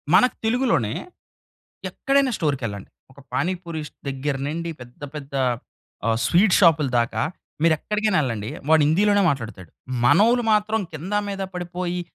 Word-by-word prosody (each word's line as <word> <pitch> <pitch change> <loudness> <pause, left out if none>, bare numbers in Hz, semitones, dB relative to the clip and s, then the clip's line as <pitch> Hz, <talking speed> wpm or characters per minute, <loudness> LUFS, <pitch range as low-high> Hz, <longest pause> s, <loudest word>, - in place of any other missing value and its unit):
మనకు 250 +7 +5
తెలుగులోనే 220 - +1 1.0
ఎక్కడైనా 275 -1 +1
స్టోర్‌కెళ్ళండి. 130 - -3 0.2
ఒక 130 - -22
పానీపూరీష్ 170 -4 -3 0.2
దెగ్గర 135 +1 -2
నుండి 170 +2 -3
పెద్ద 120 +3 -13
పెద్దా 140 -2 -3 0.6
ఆహ్, 115 0 +2
స్వీట్ 185 - +4
షాప్‌లదాకా, 125 - +3 0.4
మీరు 165 -1 +5
ఎక్కడికైనా 210 -1 0
ఎళ్ళండి. 110 -3 -3 0.2
వాడు 160 -1 +6
హిందీలోనే 205 +5 +3
మాట్లాడతాడు. 110 - -5 0.3
మనోళ్ళు 230 - +5
మాత్రం 215 +1 +2
కింద 175 +7 -4
మీద 195 -1 -3
పడిపోయి 180 0 -3
165 Hz, 120 wpm, -23 LUFS, 130-205 Hz, 1.0 s, వాడు